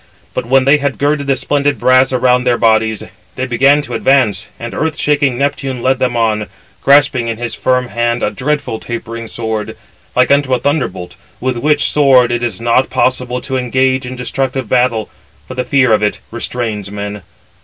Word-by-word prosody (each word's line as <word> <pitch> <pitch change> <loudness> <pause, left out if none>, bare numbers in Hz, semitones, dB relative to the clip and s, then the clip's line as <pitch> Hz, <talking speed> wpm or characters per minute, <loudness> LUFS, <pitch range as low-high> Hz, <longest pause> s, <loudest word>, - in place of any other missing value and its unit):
But - - -3
when 130 +1 +3
they 140 +2 +5
had 140 -1 -2
girded 145 0 0
the 135 - +2
splendid 145 +2 0
brass 130 +1 +4
around 125 0 +2
their 125 -1 +2
bodies, 110 -2 +2 0.3
they 130 - -2
began 135 +4 +3
to - - -7
advance; 110 -7 +1
and 120 0 -6
earth 155 -1 -2
shaking 145 -4 +1
Neptune 140 -2 -2
led 130 0 +2
them 125 -2 0
on, 110 -2 0 0.3
grasping 140 -4 +3
in 115 -1 -3
his 120 0 -4
firm 125 -1 0
hand 120 0 -1
a - - 0
dreadful 130 -1 -2
tapering 115 -1 -6
sword, 110 -2 -4 0.4
like 125 +1 +3
unto 140 -2 +3
a - - -2
thunderbolt, 95 - -2 0.2
with 130 -1 -2
which 150 +3 +1
[sword] 130 -4 +4
it 120 0 -1
is 115 -6 -3
not 120 +3 +1
possible 125 -1 0
to 135 -2 -3
engage 130 +1 0
in 130 - -6
destructive 130 0 -2
battle, 120 -3 +1 0.4
for - - -7
the 125 0 -2
fear 125 -1 +2
[of 105 - +2
it] 105 -1 0
restrains 115 -3 -3
men. 105 0 -6
125 Hz, 185 wpm, -15 LUFS, 115-135 Hz, 0.4 s, they